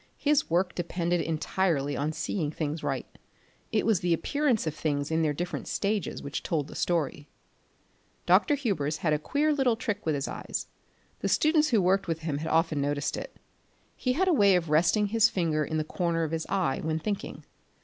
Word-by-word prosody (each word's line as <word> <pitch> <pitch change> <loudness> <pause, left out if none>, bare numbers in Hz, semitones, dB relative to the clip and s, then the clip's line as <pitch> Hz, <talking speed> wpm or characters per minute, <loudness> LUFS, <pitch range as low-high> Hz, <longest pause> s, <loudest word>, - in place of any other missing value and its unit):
His 295 -1 +2
work 175 +1 +1
depended 175 0 -1
entirely 160 -2 0
on 150 +2 -1
seeing 155 0 -2
things 155 0 -3
right; - - -2 0.7
it 215 - +1
was 220 -5 +3
the 175 -1 +2
appearance 280 - 0
of 155 - -1
things 145 -1 -2
in 160 0 +2
their 155 -2 +2
different 175 +4 -4
stages 200 -2 -2
which 140 0 -4
told 150 -4 -1
the - - -10
story. 150 -4 -1 1.0
Dr. 295 - +4
Hubers 180 - -1
had 155 - +3
a 150 - +1
queer 295 - +1
little 265 -5 +2
trick 220 -3 -3
with 155 -2 0
his 140 0 -2
eyes; - - -4 0.5
the - - -1
students 310 0 +3
who 220 -6 +3
worked 190 +2 +2
with 165 -1 -2
him 155 -3 -2
had 160 +1 -4
often 165 -2 +2
noticed 145 0 -1
it. - - -7 0.6
He 255 - 0
had 375 +8 +1
a 365 - +4
way 200 -8 +5
of 165 -4 -1
resting 175 +7 +4
his 225 +1 +4
finger 160 -4 0
in 155 +2 -2
the 155 - 0
corner 165 +1 -1
of 160 - -2
his 165 -1 -3
eye 175 -8 0
when 160 0 -1
thinking. 200 +5 -4
170 Hz, 195 wpm, -28 LUFS, 155-210 Hz, 1.0 s, way